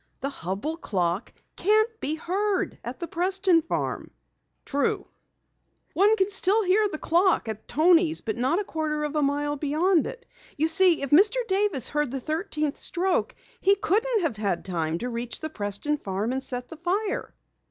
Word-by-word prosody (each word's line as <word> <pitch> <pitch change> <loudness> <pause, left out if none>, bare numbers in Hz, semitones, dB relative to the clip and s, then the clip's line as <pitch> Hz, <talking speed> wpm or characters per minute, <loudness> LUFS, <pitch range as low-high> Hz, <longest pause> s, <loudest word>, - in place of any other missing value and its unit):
The 275 - -1
Hubell 200 - -4
clock 180 +1 -1 0.2
can't 435 +3 +2
be 305 -3 0
heard 385 +5 -1
at - - -6
the 340 - -4
Preston 370 0 +2
farm." - - -3 0.6
"True." 285 0 0 0.9
"One 410 +4 +4
can 390 -1 0
still 400 +3 +3
hear 410 +3 +3
the 310 - -4
clock 345 - +2
at 220 -1 -6
Toni's 325 +3 +3
but 220 - -3
not 260 +8 +1
a 415 - 0
quarter 310 -4 -2
of 300 0 -3
a 300 - +2
mile 290 +1 0
beyond 315 +4 +2
it. 485 -1 -9 0.3
You 315 +3 +2
see, 360 -3 +4
if 275 - -4
Mr. 400 +10 +6
Davis 385 - +1
heard 295 -2 0
the 270 +2 -4
thirteenth 305 0 -3
stroke, 365 +1 0 0.2
he 395 +1 +4
couldn't 440 +4 +1
have 310 -11 -1
had 200 -5 -2
time 165 -3 -1
to 240 - -4
reach 235 0 -3
the 315 - -5
Preston 210 +7 -2
farm 200 +4 -2
and 265 +1 -2
set 250 -1 -4
the 325 - -9
fire." 390 +5 -2
315 Hz, 175 wpm, -26 LUFS, 265-380 Hz, 0.9 s, Mr